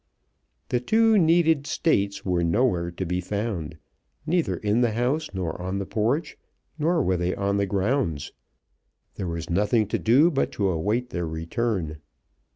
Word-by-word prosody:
The 125 - +1
two 225 - +3
needed 160 -3 +3
States 100 -9 0
were 90 -2 +1
nowhere 85 -1 +1
to 85 +2 -5
be 90 +1 -1
found, 90 -5 -3 0.5
neither 170 0 +1
in 105 +3 +1
the 120 -3 +2
house, 130 +7 0
nor 90 -3 -4
on 95 +2 -3
the 100 - -3
porch, 125 - -1 0.4
nor 165 0 +2
were 95 -4 +1
they 90 +1 -1
on 100 0 0
the 100 0 +1
grounds. 95 - -1 0.8
There 95 - -5
was 85 -1 -4
nothing 105 +5 +2
to - - -1
do 140 +10 +4
but 135 - 0
to 100 -2 0
await 105 +9 -1
their 85 -1 -2
return. 80 0 -2
100 Hz, 160 wpm, -25 LUFS, 90-130 Hz, 0.8 s, do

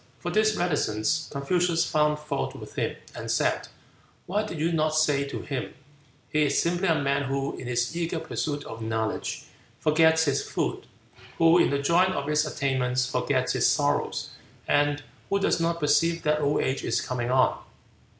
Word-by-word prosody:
For 175 - -4
this 215 +2 +3
reticence 150 -3 0
Confucius 170 +4 +1
found 150 0 +2
fault 150 0 -3
with - - -10
him, - - -2 0.2
and - - -7
said, - - +1 0.6
"Why 205 +4 0
did 210 -6 -6
you 160 +3 0
not 155 -1 +1
say 145 -3 +2
to 140 - -6
him, 135 -3 -4 0.6
'He 155 - +2
is 140 - +1
simply 175 +3 0
a 165 - +4
man 140 0 0
who, 135 +1 -2
in 125 - -8
his 120 +4 -1
eager 170 -1 -2
pursuit 145 -2 -3
of 115 0 -8
knowledge, 110 0 -2 0.4
forgets 160 +1 +4
his 140 -3 +1
food; - - -3 0.5
who, 165 +1 +5
in - - +4
the 140 - +1
joy 170 +5 +4
of 145 -7 -2
its 150 0 +2
attainments, 130 -3 0
forgets - - 0
his - - +3
sorrows; - - 0 0.4
and 145 0 +2 0.3
who 200 - +2
does 195 - +1
not 170 0 0
perceive 165 +2 +2
that 150 0 +1
old 145 0 +1
age 130 +1 -1
is 115 0 0
coming 125 -2 -3
on?'" 130 0 +3
150 Hz, 175 wpm, -26 LUFS, 140-165 Hz, 0.6 s, who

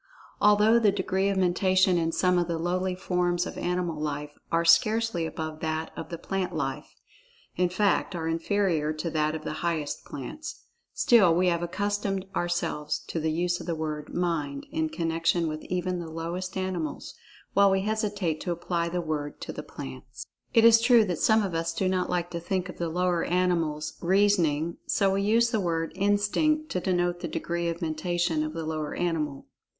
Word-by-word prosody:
Although 210 +2 +5
the 215 -3 +4
degree 190 0 0
of 195 - 0
Mentation 185 0 +3
in 165 0 0
some 180 +1 +2
of 175 - 0
the 170 -1 -1
lowly 180 +2 -1
forms 180 -1 0
of - - -6
animal 175 -3 -2
life, 150 -1 -3 0.2
are 165 0 +2
scarcely 185 +1 +3
above 155 -1 -5
that 160 0 -2
of - - -7
the 170 - -5
plant 190 +2 -3
life - - -4 0.6
(in 180 -1 +2
fact, 195 0 +1
are 160 -1 -3
inferior 165 -2 0
to 160 +2 -4
that 155 0 0
of 155 - -6
the - - -3
highest 165 -4 -2
plants), 300 - -7 0.3
still 195 -9 +5
we 180 +1 +3
have 170 -1 0
accustomed 200 +2 -2
ourselves 175 -4 -1
to 165 - -2
the 160 0 0
use 175 +2 0
of - - -9
the 170 - -1
word 155 -1 -4
"Mind" 155 -6 -2
in 160 0 -1
connection 165 +1 0
with 155 0 -4
even 180 0 -2
the 170 -2 -6
lowest 170 +4 -4
animals, 180 -5 -3 0.4
while 200 0 +6
we 190 0 +2
hesitate 205 -6 -1
to 180 - -2
apply 170 0 -1
the 175 +1 -2
word 150 -3 -4
to - - -5
the - - -5
plants. 65 -1 -9 0.3
It 230 0 +5
is 230 0 +8
true 240 -2 +6
that 180 -4 -2
some 220 -1 +4
of 190 -3 -3
us 165 0 -1
do 190 - 0
not 185 -1 0
like 175 -1 -1
to 170 - -3
think 185 +1 -2
of - - -9
the 170 -1 -1
lower 175 0 +1
animals 165 -4 0
"reasoning," 170 -4 +2
so 195 -2 +2
we 195 - +1
use 230 +3 +3
the 220 - +1
word 165 -2 -1
"Instinct" 205 +11 +1
to 180 - 0
denote 175 -1 0
the 175 - -4
degree 170 +2 -2
of 170 +1 -3
Mentation 165 0 0
of 155 0 -4
the 165 -1 -4
lower 155 -1 -3
animal. 155 -5 -2
175 Hz, 190 wpm, -27 LUFS, 160-190 Hz, 0.6 s, is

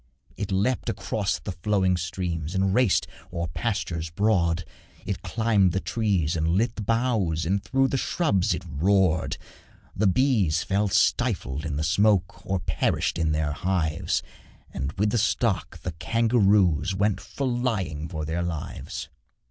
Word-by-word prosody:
It 100 -2 -4
leapt 105 +6 0
across 100 -3 -1
the 100 - -6
flowing 95 +1 +1
streams 85 -1 -3
And 95 0 +2
raced 120 -3 +3 0.3
o'er 85 0 -2
pastures 85 -3 -2
broad; 85 -3 +1 0.4
It 100 0 -3
climbed 100 -2 +2
the 95 - +1
trees 95 -8 0
and 80 -1 0
lit 105 +8 +1
the - - -5
boughs 105 -7 0
And 95 +3 0
through 135 0 +2
the 135 - 0
scrubs 105 - +1
it - - -7
roared. 85 +2 +2 0.6
The 105 +1 +2
bees 100 - +2
fell 100 +2 +1
stifled 75 -5 +1
in 75 - -3
the 75 - -1
smoke 90 +1 +2
Or 95 0 -1
perished 85 - 0
in 80 -2 +1
their 75 -1 0
hives, 85 0 -1 0.5
And 65 +2 -3
with 105 +1 +1
the 120 - +2
stock 110 -3 0
the 90 - -2
kangaroos 100 -2 +2
Went 100 +1 +1
flying 115 - -2
for 80 -3 -4
their 80 +3 -2
lives. 85 -3 -5
95 Hz, 150 wpm, -26 LUFS, 80-105 Hz, 0.6 s, raced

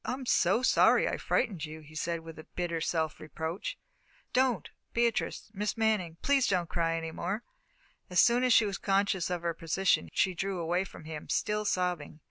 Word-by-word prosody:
"I'm 255 +1 -3
so 240 0 +3
sorry - - +5
I - - -1
frightened 185 -8 0
you," 155 0 -6
he 155 +1 -15
said, 165 +2 -2
with 160 -1 -10
bitter 170 -2 -2
self 160 -1 -1
reproach. 160 +3 -5 0.6
"Don't, 255 -2 +2 0.3
Beatrice 235 -2 0
Miss 210 +2 -2
Manning, 210 -7 +1
please 280 -2 +3
don't 180 -3 +1
cry 165 -1 0
any 165 0 -4
more!" 195 +8 -3 0.7
As 180 - +2
soon 245 +1 +5
as 255 - +3
she 225 - +6
was 200 -1 -3
conscious 195 -2 +1
of 175 -1 -2
her 170 -1 0
position, 165 - +1
she 190 - +2
drew 195 +2 -2
away 175 +3 0
from 160 - -12
him, 155 -1 -7
still 210 0 0
sobbing. 180 -6 -1
180 Hz, 180 wpm, -30 LUFS, 165-210 Hz, 0.7 s, she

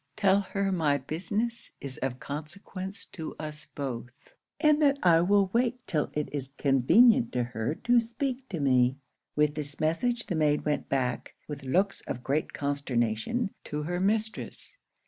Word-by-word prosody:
Tell 195 -1 +4
her 195 0 -1
my 155 -6 +2
business 200 - -3
is 135 -2 -7
of 130 -1 -2
consequence 185 +6 -6
to 160 -3 -7
us 150 -1 -6
both, 125 -4 -4 0.5
and 305 -1 +4
that 280 -2 +4
I 165 -2 +6
will 195 +1 +3
wait 245 +1 +2
till 155 -5 0
it 150 0 -1
is 135 -2 -3
convenient 140 - +5
to 125 - +1
her 120 +3 -2
to 240 0 +5
speak 255 +3 -3
to 175 - -3
me.' 130 -2 +3 0.4
With 150 0 +3
this 145 -2 -6
message 230 +10 0
the 185 - -3
maid 150 -2 +2
went 150 -1 -1
back, 125 -3 -1
with 145 -2 -6
looks 190 +9 +1
of 125 - -4
great 145 +4 0
consternation, 140 - -1
to 150 0 -3
her 175 +3 -2
mistress. 220 - -2
155 Hz, 160 wpm, -29 LUFS, 140-205 Hz, 0.5 s, I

